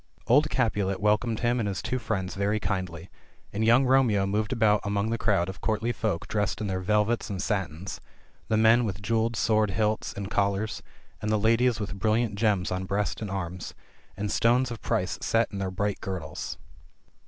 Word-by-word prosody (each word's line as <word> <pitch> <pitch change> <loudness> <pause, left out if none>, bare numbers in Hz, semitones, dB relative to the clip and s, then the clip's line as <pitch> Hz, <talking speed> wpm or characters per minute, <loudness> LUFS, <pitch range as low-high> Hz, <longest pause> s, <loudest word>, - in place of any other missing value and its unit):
Old 145 +6 +4
Capulet 105 -8 0
welcomed 105 +2 +1
him 120 0 +1
and 110 - 0
his 95 -2 -3
two 125 +2 -2
friends 95 -6 -2
very 100 +2 0
kindly 95 -4 -4 0.2
— - - -33
and 105 +2 -1
young 120 +4 +5
Romeo 125 -7 +3
moved 105 +4 -1
about 110 -4 +3
among 100 +2 -1
the 115 - 0
crowd 100 -5 +2
of 95 - -7
courtly 110 +2 0
folk 110 -6 -2
dressed 105 -1 -1
in 110 - -2
their 95 -2 -1
velvets 105 +4 +1
and 100 -2 -4
satins, 95 -3 -3 0.5
the 110 - +1
men 115 +2 +5
with 100 -3 -4
jewelled 115 +2 +1
sword 110 0 +2
hilts 110 +2 0
and 100 0 -6
col 100 0 +2
lars, 105 +2 -4 0.4
and 105 - -2
the 110 - +3
ladies 115 +1 +3
with 100 -1 -5
brilliant 110 +2 +1
gems 100 -3 +1
on 90 +1 -2
breast 100 +3 -1
and 105 - -4
arms, 90 -2 -5 0.4
and 105 +1 -2
stones 120 +3 +3
of 115 - -6
price 90 +1 -1
set 115 +1 +1
in 100 - -5
their 95 -1 -1
bright 100 +2 -2
girdles. 90 -6 -5
105 Hz, 195 wpm, -27 LUFS, 95-115 Hz, 0.5 s, young